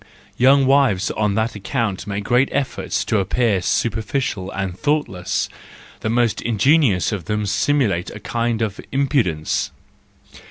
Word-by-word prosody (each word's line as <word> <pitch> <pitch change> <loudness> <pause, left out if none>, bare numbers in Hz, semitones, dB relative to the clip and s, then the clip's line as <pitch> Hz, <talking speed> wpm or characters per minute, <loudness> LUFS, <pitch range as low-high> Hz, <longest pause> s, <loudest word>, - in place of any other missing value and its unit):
—Young 135 +2 +5
wives 130 -9 +3
on 105 -2 0
that 110 +2 0
account 105 -1 -3
make 100 0 -3
great 125 +5 +2
efforts 110 -6 -2
to 110 - +1
appear 100 0 +1
superficial 110 -1 -1
and 95 -2 -4
thought¬ 150 +7 0
less; 95 0 -2 0.5
the 110 - -3
most 120 -1 +1
ingenious 120 - +3
of 100 -6 -4
them 105 0 -1
simulate 100 -2 +1
a - - -9
kind 115 -2 -1
of 105 -2 -3
impudence. 130 - 0
110 Hz, 135 wpm, -20 LUFS, 100-130 Hz, 0.5 s, Young